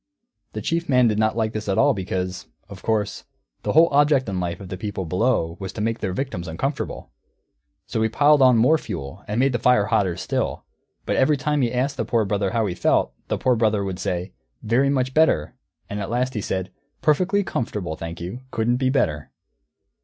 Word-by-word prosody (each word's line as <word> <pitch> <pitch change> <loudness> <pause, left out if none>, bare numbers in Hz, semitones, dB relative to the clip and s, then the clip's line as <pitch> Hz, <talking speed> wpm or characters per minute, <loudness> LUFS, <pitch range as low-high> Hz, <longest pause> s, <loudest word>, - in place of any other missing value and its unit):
The - - -5
Chief 170 0 -1
Man 125 -2 +5
did 105 -1 +1
not 110 +1 +1
like 110 -1 0
this 105 -1 -4
at 95 - +1
all, 145 - +5
because, 95 -2 -4 0.2
of 100 -2 -11
course, 110 -3 -1 0.4
the - - -2
whole 165 +2 +7
object 145 -2 +3
in 95 -2 -2
life 85 -1 -3
of 95 -3 -9
the 95 - -4
people 95 -1 -4
Below 90 -2 0
was 95 -2 -5
to - - -7
make 115 +1 -1
their 95 - -2
victims 95 -5 -4
uncomfortable. 135 - -4 0.7
So 110 - -2
he 110 - +2
piled 145 +5 +4
on 130 -2 +6
more 150 +8 +4
fuel 70 - -7
and 105 +3 -1
made 135 +1 +3
the 120 - 0
fire 120 -3 +4
hotter 95 -5 +1
still. - - -2 0.4
But - - 0
every 145 +3 +3
time 150 +2 0
he 120 -2 +1
asked 135 +3 -1
the - - 0
Poor 115 -3 +1
Brother 100 -1 0
how 115 +1 0
he 95 - -2
felt, 85 - +1
the - - -1
Poor 125 -1 +2
Brother 110 -3 +1
would 95 -2 -4
say, 90 0 -3 0.3
"Very 125 +5 +2
much 130 -2 0
better"; 155 - +3 0.3
and 105 - -5
at 100 - -4
last 125 +2 0
he 105 - -2
said, 95 -1 -3 0.3
"Perfectly 185 +7 +2
comfortable, 105 - -3
thank 85 +1 -7
you; 90 +9 -6
couldn't 120 0 0
be 130 0 +1
better." 75 - 0
110 Hz, 210 wpm, -23 LUFS, 95-130 Hz, 0.7 s, whole